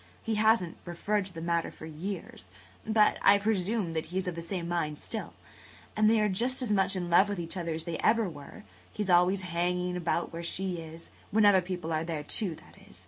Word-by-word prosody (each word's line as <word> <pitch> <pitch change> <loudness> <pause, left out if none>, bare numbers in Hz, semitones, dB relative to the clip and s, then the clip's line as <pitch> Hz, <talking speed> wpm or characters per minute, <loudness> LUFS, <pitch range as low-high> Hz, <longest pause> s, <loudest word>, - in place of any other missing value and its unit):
He 225 - -1
hasn't 215 -5 +2
referred 190 +3 -1
to 190 - -11
the 165 - -6
matter 170 0 0
for - - -11
years, 160 - -7 0.4
but 215 -1 +3
I 200 - +6
presume 200 -2 0
that 160 -1 -3
he 180 - -5
is 190 0 -1
of 180 - -1
the 170 - -6
same 170 0 -4
mind 165 -4 -1
still. 220 +7 -6 0.6
And 215 0 +4
they 225 0 +4
are 210 - +3
just 245 +7 +1
as 230 - -1
much 195 -1 +2
in 175 -2 -3
love 190 +4 +6
with 205 -3 -3
each 170 +1 -4
other 170 -3 -2
as 160 - -4
they 165 -1 -4
ever 225 -1 +3
were. 160 +5 -10 0.3
He's 205 -3 -2
always 180 +2 +4
hanging 180 +1 -1
about 170 -1 -1
where 165 - -5
she 180 +1 -2
is–when 165 +6 -2
other 195 -2 +6
people 175 -3 -4
are 155 0 0
there, 160 -3 -4
too, 180 +2 0
that - - -18
is. - - -15
180 Hz, 220 wpm, -29 LUFS, 170-205 Hz, 0.6 s, I